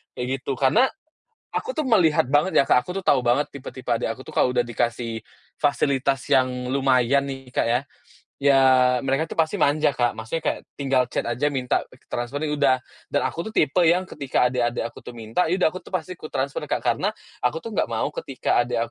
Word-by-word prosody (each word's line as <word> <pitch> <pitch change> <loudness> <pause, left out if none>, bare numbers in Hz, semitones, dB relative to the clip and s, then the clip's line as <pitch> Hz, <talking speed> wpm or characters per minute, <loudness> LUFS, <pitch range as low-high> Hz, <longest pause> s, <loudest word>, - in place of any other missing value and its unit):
kayak 125 0 -3
gitu. 135 +1 -3
Karena 175 - +4 0.7
aku - - -3
tuh 310 - 0
melihat 180 - +4
banget 150 +6 +3
ya, 140 - +6
Kak, 125 - +4
aku 180 +4 -6
tuh 185 - -19
tahu - - +4
banget 125 +4 +1
tipe-tipe 130 -2 -9
adek 115 - 0
aku 130 - -11
tuh - - -11
kalau 125 - +2
udah 120 - +3
dikasih 115 -1 -2 0.4
fasilitas 140 -2 +1
yang 130 -1 +5 0.2
lumayan 135 0 +2
nih, 135 -2 -8
Kak, - - +1
ya 120 +2 +2 0.6
ya 140 -1 +5 0.4
mereka 135 +4 0
tuh 165 - -7
pasti 160 -1 +2
manja, 145 -1 +2
Kak, 120 -1 +2
maksudnya 115 +9 -4
kayak, - - 0 0.2
tinggal 130 -3 +1
chat - - -2
aja 120 +5 -1
minta 130 -3 0 0.3
transfer 120 +5 -3
ya 150 - -1
udah, 140 -3 +3 0.3
dan 145 - 0
aku - - -3 0.2
tipe 150 +4 +2
yang 180 +2 +3
ketika 135 -7 0
adik-adik 120 -2 0
aku 115 - -7
tuh 120 - -10
minta, 115 +10 -1
ya 175 - +1
udah 185 -4 +2
aku 185 - -7
tuh - - -17
pasti 185 - -3
kutransfer, 140 -2 -3
Kak, - - -2
karena - - +1 0.3
aku 125 +6 -1
tuh 230 - -6
nggak - - 0
mau - - -2
ketika - - -1
adek - - 0
135 Hz, 205 wpm, -23 LUFS, 125-155 Hz, 0.7 s, ya